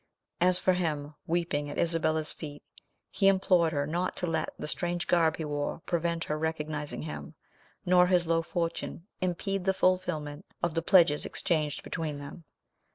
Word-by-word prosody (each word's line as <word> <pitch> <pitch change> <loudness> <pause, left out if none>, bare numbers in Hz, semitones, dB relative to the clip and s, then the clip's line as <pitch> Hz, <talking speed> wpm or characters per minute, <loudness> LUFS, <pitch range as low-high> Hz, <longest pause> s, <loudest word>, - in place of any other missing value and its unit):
As 180 +1 +6
for 185 - +2
him, 155 -5 -2
weeping 165 -4 0
at 145 - -6
Isabella's 160 -2 +1
feet, 145 -2 -8 0.5
he 195 - +2
implored 185 -4 +4
her 145 -2 0
not 175 +5 -1
to - - -1
let 165 -2 -1
the - - -5
strange 175 +2 -2
garb 165 -2 +3
he 160 - -3
wore 145 +1 -3
prevent 170 -1 0
her 150 0 -2
recognising 150 -2 -3
him, 75 - -7 0.5
nor 180 0 +5
his 180 -1 +3
low 165 0 +2
fortune 170 0 -3 0.2
impede 185 +1 -1
the 190 -1 +2
fulfilment 175 -5 0 0.2
of 170 -2 +1
the 165 - 0
pledges 165 -4 +5
exchanged 155 -4 -1
between 155 -3 -3
them. 145 +4 -9
165 Hz, 160 wpm, -29 LUFS, 150-180 Hz, 0.5 s, As